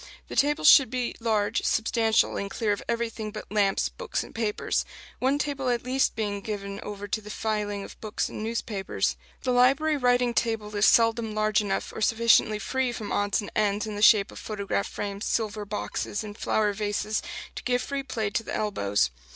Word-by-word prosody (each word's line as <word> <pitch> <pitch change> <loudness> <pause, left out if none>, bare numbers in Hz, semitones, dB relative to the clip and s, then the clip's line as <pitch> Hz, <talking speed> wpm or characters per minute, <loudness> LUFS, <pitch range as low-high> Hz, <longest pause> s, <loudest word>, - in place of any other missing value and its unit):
The - - -6
tables 295 +2 +3
should 275 -4 +8
be 250 -1 -2
large, 220 -3 +1
substantial, 225 0 +2
and 200 - -3
clear 210 +1 -1
of 205 - -1
everything 230 -2 -2
but 215 0 -7
lamps, 200 -2 +2
books - - -4
and - - -13
papers 220 -2 -1 0.4
one 265 +3 +2
table 280 -3 -2
at 240 -1 0
least 260 +2 +1
being 205 -2 -2
given 200 -1 -5
over 205 0 -6
to 220 +2 -2
the 210 - -11
filing 210 -1 -2
of - - -12
books 215 -1 -2
and - - -7
newspapers. 220 -3 -2 0.3
The 255 - +1
library 275 +5 +4
writing 245 -2 +2
table 220 -2 -1
is 205 +1 +4
seldom 230 -1 +3
large 215 -1 +2
enough, 200 -2 -2
or - - -6
sufficiently 225 -1 +4
free 260 +4 -1
from 220 -3 -6
odds 205 +2 +1
and 205 - -8
ends 210 0 +1
in 215 -1 -5
the 205 - -4
shape 210 -2 +6
of - - -9
photograph 200 -2 -2
frames, 200 0 -5
silver 215 -2 -1
boxes, 205 +1 -3
and 205 -1 -8
flower 210 -1 +1
vases, 210 +1 -1 0.3
to - - -6
give 250 0 0
free 280 -1 -3
play 230 -6 -3
to 215 - 0
the - - -5
elbows. 100 - 0
215 Hz, 190 wpm, -27 LUFS, 205-235 Hz, 0.4 s, should